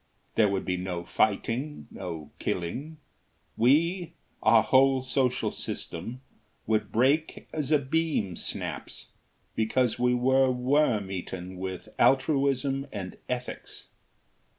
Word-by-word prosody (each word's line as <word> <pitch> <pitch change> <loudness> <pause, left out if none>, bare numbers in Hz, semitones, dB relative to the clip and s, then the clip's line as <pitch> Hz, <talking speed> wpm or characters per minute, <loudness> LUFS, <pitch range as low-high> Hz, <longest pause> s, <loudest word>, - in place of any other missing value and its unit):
There 105 -2 +4
would 100 -1 -1
be 90 0 0
no 90 -1 -3
fighting, 115 - 0
no 85 -5 -7
killing; 130 - -3 0.6
we 165 +8 +2 0.3
our - - +6
whole 135 0 +4
social 130 -1 +1
system 115 +10 -5 0.4
would 105 -1 0
break 140 +7 +1
as 150 -2 -2
a 150 - +7
beam 140 - 0
snaps, - - -4 0.4
because 120 +2 +1
we 125 0 +3
were 130 +2 +4
worm 125 -5 +2
eaten 95 0 -5
with 95 -1 -5
altruism 135 0 +2
and 95 -3 -6
ethics. 125 0 -5
125 Hz, 110 wpm, -28 LUFS, 95-135 Hz, 0.6 s, a